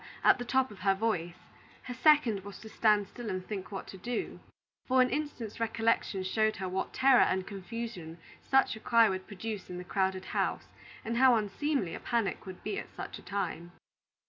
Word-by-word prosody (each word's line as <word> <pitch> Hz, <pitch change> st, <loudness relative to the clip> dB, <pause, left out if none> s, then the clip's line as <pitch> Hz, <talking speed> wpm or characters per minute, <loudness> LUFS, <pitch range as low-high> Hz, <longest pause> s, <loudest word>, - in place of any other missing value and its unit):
at -, -, +6 dB
the -, -, -2 dB
top 260 Hz, 0 st, +1 dB
of 200 Hz, -, -12 dB
her 195 Hz, +1 st, +2 dB
voice; 185 Hz, -5 st, -1 dB, 0.5 s
her 250 Hz, -, -6 dB
second 255 Hz, -5 st, +4 dB
was 200 Hz, 0 st, -9 dB
to 220 Hz, -, -11 dB
stand 210 Hz, -2 st, +2 dB
still 240 Hz, -3 st, -7 dB
and 185 Hz, -1 st, -3 dB
think 200 Hz, -1 st, -6 dB
what 195 Hz, -, -5 dB
to 190 Hz, -, -10 dB
do, 240 Hz, +5 st, -4 dB, 0.5 s
for 260 Hz, 0 st, +3 dB
an 255 Hz, 0 st, +4 dB
instant's 275 Hz, -7 st, -4 dB
recollection 225 Hz, -3 st, 0 dB
showed 215 Hz, +3 st, +1 dB
her 190 Hz, 0 st, -4 dB
what 190 Hz, +1 st, -2 dB
terror 265 Hz, -1 st, +5 dB
and 190 Hz, 0 st, +2 dB
confusion 195 Hz, -4 st, -6 dB, 0.2 s
such 270 Hz, -3 st, +3 dB
a -, -, -9 dB
cry 230 Hz, 0 st, +5 dB
would 185 Hz, -1 st, -3 dB
produce 210 Hz, 0 st, -6 dB
in 180 Hz, -, -6 dB
the 180 Hz, -, -6 dB
crowded 190 Hz, 0 st, -1 dB
house, -, -, -1 dB, 0.4 s
and 230 Hz, +1 st, -1 dB
how 255 Hz, -1 st, +6 dB
unseemly 215 Hz, -, -1 dB
a -, -, -5 dB
panic 230 Hz, -5 st, -1 dB
would 185 Hz, -1 st, -9 dB
be 400 Hz, -, -2 dB
at -, -, -8 dB
such -, -, -6 dB
a -, -, -13 dB
time. 175 Hz, -3 st, -4 dB
215 Hz, 195 wpm, -31 LUFS, 190-235 Hz, 0.5 s, at